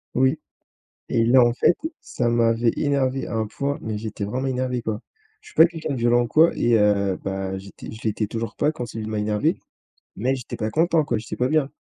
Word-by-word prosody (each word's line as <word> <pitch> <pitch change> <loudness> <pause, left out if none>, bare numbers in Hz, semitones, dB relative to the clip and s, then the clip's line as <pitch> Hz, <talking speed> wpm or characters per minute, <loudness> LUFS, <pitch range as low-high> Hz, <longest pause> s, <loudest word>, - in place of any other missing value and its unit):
Oui 130 +4 +2 0.7
et 115 - +2
là, 125 +2 +6
en 120 0 +3
fait, 170 - +3 0.2
ça 120 -1 -2
m'avait 115 0 +2
énervé 135 -2 0
à - - -6
un 110 -1 0
point, 140 +6 -3
mais 110 -1 -3
j'étais 105 -1 -5
vraiment 130 +6 -2
énervé 125 -1 -1
quoi! 110 -2 -3 0.4
Je - - -19
suis - - -18
pas 160 - +8
quelqu'un 165 -3 -4
de 130 - -3
violent 120 +1 +3
ou - - -3
quoi 160 +6 +5
et 120 -1 +3
heu, 100 -2 +2
bah 95 0 -3
j'étais 100 0 -11
je 110 - -10
l'étais 110 0 0
toujours 115 0 -4
pas 150 - +1
quand 125 -6 -5
celui 110 -1 -6
d 110 - -5
m'a 105 - -1
énervé, 105 0 0 0.6
mais 130 +5 0
j'étais 125 - -6
pas 110 0 -2
content 165 -1 +2
quoi, 120 -5 -1
j'étais 110 - -6
pas 125 - +1
bien. 155 -3 +2
120 Hz, 230 wpm, -23 LUFS, 110-135 Hz, 0.7 s, pas